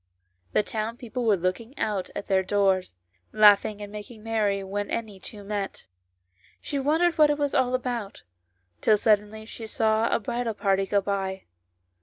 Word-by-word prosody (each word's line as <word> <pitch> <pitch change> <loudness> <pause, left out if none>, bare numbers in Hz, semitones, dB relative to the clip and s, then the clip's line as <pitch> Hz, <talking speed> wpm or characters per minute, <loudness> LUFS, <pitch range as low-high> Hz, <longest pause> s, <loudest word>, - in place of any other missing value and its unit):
The - - +3
townspeople 230 +3 -4
were 210 -3 +4
looking 205 - -3
out 200 -3 -1
at - - -4
their 190 -1 +2
doors, 190 - +1 0.4
laughing 210 -1 +5
and 205 - -8
making 210 +1 -9
merry 210 -3 0
when 200 +1 -3
any 215 -4 -4
two 205 +2 -8
met; 200 - -4 0.7
she 285 - -3
wondered 320 +5 +2
what 300 -1 +7
it 295 - +1
was 290 -1 -1
all 255 0 +2
about, 240 -5 -4 0.6
till 215 - +4
suddenly 215 0 +1
she 225 0 -8
saw 220 +1 +1
a - - +2
bridal 235 +1 -3
party 195 -1 +1
go 200 +1 +2
by. 195 -1 -3
210 Hz, 160 wpm, -26 LUFS, 200-230 Hz, 0.7 s, what